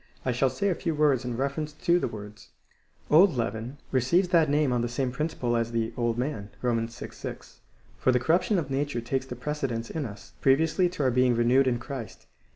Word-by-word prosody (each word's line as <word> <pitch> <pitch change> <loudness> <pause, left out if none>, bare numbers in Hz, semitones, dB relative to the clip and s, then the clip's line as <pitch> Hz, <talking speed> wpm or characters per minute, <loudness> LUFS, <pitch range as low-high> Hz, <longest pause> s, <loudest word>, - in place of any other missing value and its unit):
7. 130 - 0
shall 130 +2 +2
say 200 +9 -1
a - - +2
few 165 -1 -2
words 145 -4 +3
in 125 -2 -3
reference 140 +3 -2
to 170 +3 +2
the - - -1
words. 105 0 -10 0.6
Old 170 +1 +6
leaven 115 +4 -3
receives 135 +9 +2
that 165 -4 +4
name 145 -2 +2
on 120 - +1
the 120 - -1
same 125 +1 -1
principle 125 -3 -1
as 115 0 -1
the 115 0 -1
old 120 -1 0
man, 120 -6 -3
(Rom. 120 -2 +2
vi. 115 - -8
6*,) - - -9 0.4
for 130 - +3
the 125 - +3
corruption 180 - +2
of 145 -6 -2
nature 140 -2 -1
takes 130 +3 -2
the 125 - -6
precedence 125 -3 -3
in 155 -5 -3
us, 105 -2 -12
previously 160 +6 +3
to 175 -5 -3
our 130 - +3
being 125 0 +3
renewed 125 +3 +4
in 120 -2 +2
Christ. 120 -1 -8
130 Hz, 210 wpm, -27 LUFS, 120-150 Hz, 0.6 s, Old